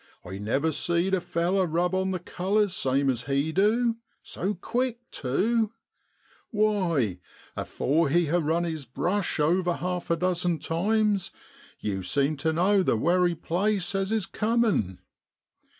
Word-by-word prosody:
I 95 +2 -7
never 135 +10 0
seed 170 +5 0
a 190 - +2
feller 180 +3 0
rub 175 +3 0
on 190 0 +1
the 185 - -1
colours 190 +3 0
same 135 0 +1
as 120 -3 0
he 140 +3 0
du, 225 +6 +2 0.3
so 200 +4 -3
quick 240 +5 -1
tew; 220 - 0 0.8
why, 180 - +1 0.4
afore 155 +3 0
he 170 +4 +3
ha' 170 +3 +1
run 165 +3 +1
his 160 -4 -4
brush 180 - -1
over 175 +4 +2
half 180 0 -3
a 170 - +3
dozen 180 -1 0
times 205 +4 0 0.5
yew 95 -2 -2
seem 140 +10 0
tu 155 +3 0
know 190 +5 +3
the 150 - +1
wery 175 +6 +2
place 185 +4 -1
as 195 +1 -1
is 220 -3 0
comin'. 210 - 0
175 Hz, 145 wpm, -27 LUFS, 155-200 Hz, 0.8 s, he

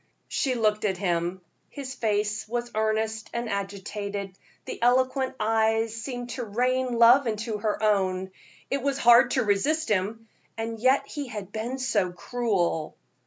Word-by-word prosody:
She 260 -2 0
looked 215 -2 +1
at 195 -3 0
him. 175 -1 -1 0.3
His 270 -3 -6
face 210 -3 -1
was 240 +1 -3
earnest 220 0 -1
and 235 0 -2
agitated, 200 -1 -4 0.3
the - - -7
eloquent 255 +2 +2
eyes 225 0 +2
seemed 245 +1 -5
to 255 - -4
rain 250 +3 0
love 240 +3 +7
into 220 0 -2
her 215 0 -1
own. 190 -3 +1 0.4
It 275 - 0
was 275 +1 0
hard 240 -2 +6
to 255 - +3
resist 285 +10 +1
him, 215 +3 -1 0.3
and 225 0 -4
yet 260 +4 +3
he 290 -3 -6
had 205 -5 -7
been 230 +5 -3
so 210 -8 0
cruel. 180 -5 -1
220 Hz, 150 wpm, -26 LUFS, 205-245 Hz, 0.4 s, love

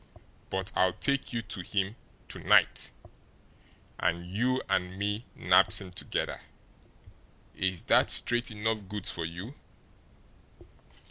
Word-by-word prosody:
BUT 95 0 -3
I'LL 95 -1 +3
TAKE 140 +6 0
YOU 115 -2 -2
TO 105 -2 -3
HIM 100 +3 -1 0.3
TO - - -6
NIGHT - - +4 1.1
and 85 +1 0
you 130 +4 +2
and 90 +1 0
me 105 +3 -2
nabs - - +4
him 95 -2 -8
together. 90 - -3 1.1
Is 95 -3 -1
that - - +4
straight 120 0 +2
enough 110 -1 -2
goods 105 -1 -2
for 85 - -3
you?" 90 +10 -6
100 Hz, 120 wpm, -30 LUFS, 95-115 Hz, 1.1 s, NIGHT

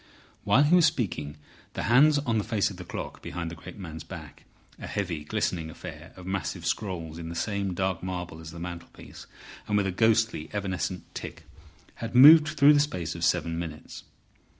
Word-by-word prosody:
While 140 - +5
he 150 +4 +3
was 175 -2 +7
speaking 85 - -3 0.4
the - - -2
hands 145 +6 +5
on 120 -6 0
the - - -1
face 105 -3 0
of 95 - -10
the 90 - -7
clock - - -7
behind 85 -1 -5
the - - -7
great 80 - -11
man's 80 -5 -8
back—a - - -12
heavy, 85 -7 -3
glistening 80 +2 -2
affair 80 - -10
of 90 - -11
massive 95 -2 -3
scrolls 85 -6 -3
in 80 -1 -6
the 85 - -6
same 100 0 -2
dark 95 -1 -1
marble 90 -3 -5
as 80 -1 -9
the 85 - -10
mantelpiece, 85 0 -9 0.4
and 105 - +1
with 100 - +2
a 95 - 0
ghostly, 110 -4 +2
evanescent 95 -2 -3
tick—had 115 +1 -10
moved 150 +4 +9
through 145 +1 +7
the 145 - +4
space 90 - -1
of 85 - -7
seven 85 -1 +1
minutes. 80 -3 -7
95 Hz, 180 wpm, -27 LUFS, 85-115 Hz, 0.4 s, moved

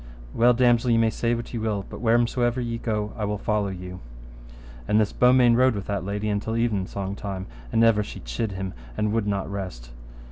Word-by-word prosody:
Well, 120 +1 +4
damosel, 120 0 +3
ye 115 - +4
may 115 -1 +3
say 120 +1 0
what 120 +1 -6
ye 115 - -2
will, 105 -3 -2
but - - -9
wheresomever 120 +1 +2
ye 115 -1 -3
go 105 -2 -2
I 110 - -4
will 105 0 -2
follow 105 0 0
you. 90 -1 -7 0.9
So - - -2
this 105 -1 +3
Beaumains 125 -1 +5
rode 130 -1 +4
with 100 - -4
that 100 -2 -2
lady 100 +2 -3
till 110 +2 -3
evensong 100 -4 -1
time, 95 -2 -5 0.3
and 115 - +3
ever 115 -2 +5
she 105 - -7
chid - - -3
him, 95 -1 -4 0.2
and 105 0 +1
would 110 -2 0
not 100 -1 -1
rest. 95 -12 -6
105 Hz, 205 wpm, -25 LUFS, 100-115 Hz, 0.9 s, Beaumains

